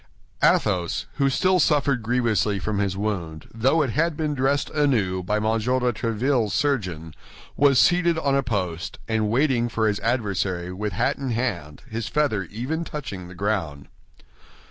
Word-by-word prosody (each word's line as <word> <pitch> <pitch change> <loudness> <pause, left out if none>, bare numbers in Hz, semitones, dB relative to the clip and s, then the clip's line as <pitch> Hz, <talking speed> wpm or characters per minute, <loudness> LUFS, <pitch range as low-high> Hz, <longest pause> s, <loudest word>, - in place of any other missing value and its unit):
Athos, 90 -4 +2
who 140 -1 +3
still 185 +7 +2
suffered 140 -5 +2
grievously 110 -3 +1
from 100 +2 -2
his 95 -2 -1
wound, 90 -7 -3
though 135 +8 +2
it 130 - -2
had 165 +4 0
been 155 -2 -1
dressed 140 +1 0
anew 115 -12 +1
by 105 +4 -1
M. 105 - -1
de 110 - +1 0.4
Tréville's 115 -1 0
surgeon, 90 - -1 0.4
was 140 -2 +4
seated 175 +2 +4
on 140 -4 0
a 140 - +3
post 95 -9 -3
and 110 -2 0
waiting 120 -1 +2
for 110 -1 0
his 105 -1 0
adversary 95 -7 -1
with 105 +1 -3
hat 90 - 0
in 135 -2 -3
hand, 105 - -3
his 115 -1 -4
feather 140 -11 0
even 130 - -4
touching 100 - -6
the 90 - -11
ground. 90 -8 -2
115 Hz, 160 wpm, -24 LUFS, 95-140 Hz, 0.4 s, was